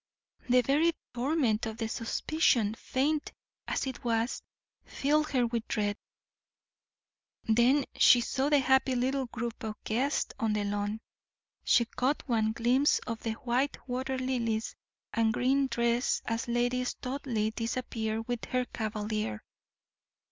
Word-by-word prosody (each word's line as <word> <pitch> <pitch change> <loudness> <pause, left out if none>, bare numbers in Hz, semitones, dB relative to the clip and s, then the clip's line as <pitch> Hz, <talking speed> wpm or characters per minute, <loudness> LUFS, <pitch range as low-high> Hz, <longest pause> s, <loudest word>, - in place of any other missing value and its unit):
The 250 +1 +6
very 305 +7 +3 0.2
torment 245 -4 +1
of 220 0 -6
the 225 -2 -2
suspicion, 230 -1 +1
faint 290 +6 -1 0.3
as - - -1
it 260 -2 -6
was, 230 +1 0 0.4
filled 305 +2 +1
her 255 -3 +2
with 230 -1 -2
dread. 205 -2 0 1.5
Then 240 +5 +3
she 245 - +7
saw 265 +4 0
the 295 - +5
happy 265 0 +3
little 260 +1 0
group 235 0 -5
of 220 -2 -4
guests 260 +6 0
on 220 -2 +1
the 210 -1 0
lawn, 205 +1 -2 0.6
she 235 - +4
caught 255 +6 -1
one 220 -3 +2
glimpse 245 +5 +3
of 230 -2 -4
the 225 - -2
white 255 +4 -1
water 260 +1 -2
lilies 235 -4 -1 0.4
and 225 -1 +2
green 270 +2 +2
dress 235 0 +1
as 230 +1 -2
Lady 245 +1 +1
Studleigh 250 -4 -2
disappeared 225 -1 -3
with 245 -2 -3
her 255 -1 0
cavalier. 215 - -3
240 Hz, 135 wpm, -30 LUFS, 225-265 Hz, 1.5 s, she